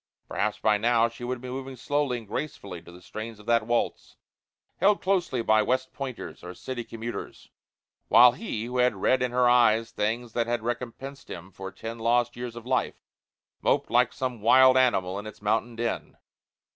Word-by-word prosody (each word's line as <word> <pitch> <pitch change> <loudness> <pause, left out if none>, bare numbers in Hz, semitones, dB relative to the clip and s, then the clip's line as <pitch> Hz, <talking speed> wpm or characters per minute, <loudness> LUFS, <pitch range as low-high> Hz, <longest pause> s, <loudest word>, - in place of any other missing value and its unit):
Perhaps 105 0 -1
by 105 -1 +2
now 115 +1 +3
she 115 +1 -11
would 125 0 -3
be 130 - -7
moving 130 +1 -6
slowly 140 0 -1
and 115 -3 -10
gracefully 100 - -5
to 85 - -14
the 90 +1 -14
strains 110 +2 -7
of 105 - -15
that 115 -1 +2
waltz, 120 0 -1 0.6
held 200 +1 +3
closely 180 -11 0
by 110 -1 +4
West 130 +4 -1
Pointers 130 -4 -7
or 90 +1 -8
city 125 +5 -5
commuters, 115 +1 -7 0.6
while 120 +2 +8
he, 120 - -5
who 125 +1 -4
had 125 -3 +3
read 125 +7 +2
in 125 - +1
her 125 0 +2
eyes 115 -2 +4
things 115 +2 -2
that 115 -1 0
had 120 -1 -1
recompensed 125 +3 -5
him 90 +2 -8
for 95 +1 -8
ten 115 +3 -7
lost 120 +1 +1
years 120 -1 -6
of 120 -1 -9
life, 130 0 0 0.7
moped - - +1
like - - +4
some 125 -4 -4
wild 130 +2 +6
animal 100 -7 +2
in 105 - -7
its 110 0 -10
mountain 115 +3 0
den. 115 0 -3
120 Hz, 185 wpm, -27 LUFS, 110-125 Hz, 0.7 s, while